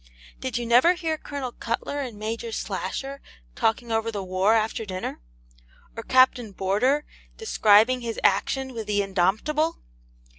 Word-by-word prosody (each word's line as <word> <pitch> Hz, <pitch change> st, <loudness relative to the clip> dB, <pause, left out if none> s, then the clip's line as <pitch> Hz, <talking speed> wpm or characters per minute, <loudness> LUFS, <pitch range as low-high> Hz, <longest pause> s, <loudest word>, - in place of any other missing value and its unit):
Did 260 Hz, -2 st, -3 dB
you 240 Hz, -, -3 dB
never 245 Hz, +9 st, +5 dB
hear 325 Hz, -3 st, -2 dB
Colonel 280 Hz, -4 st, -6 dB
Cutler 235 Hz, +5 st, -3 dB
and 250 Hz, -6 st, -5 dB
Major 225 Hz, +2 st, -4 dB
Slasher 275 Hz, +4 st, -4 dB, 0.3 s
talking 230 Hz, +1 st, 0 dB
over 225 Hz, 0 st, 0 dB
the 200 Hz, -3 st, -4 dB
war 185 Hz, +4 st, +2 dB
after 225 Hz, +1 st, 0 dB
dinner? 185 Hz, -, -5 dB, 0.8 s
or 230 Hz, -, -5 dB
Captain 250 Hz, -3 st, +3 dB
Boarder 245 Hz, +11 st, +1 dB, 0.3 s
describing 230 Hz, -, +4 dB
his 230 Hz, -2 st, -4 dB
action 260 Hz, +7 st, +1 dB
with 225 Hz, -3 st, -6 dB
the 205 Hz, -1 st, +1 dB
'Indomptable?' 215 Hz, -, +1 dB
230 Hz, 140 wpm, -25 LUFS, 210-265 Hz, 0.8 s, never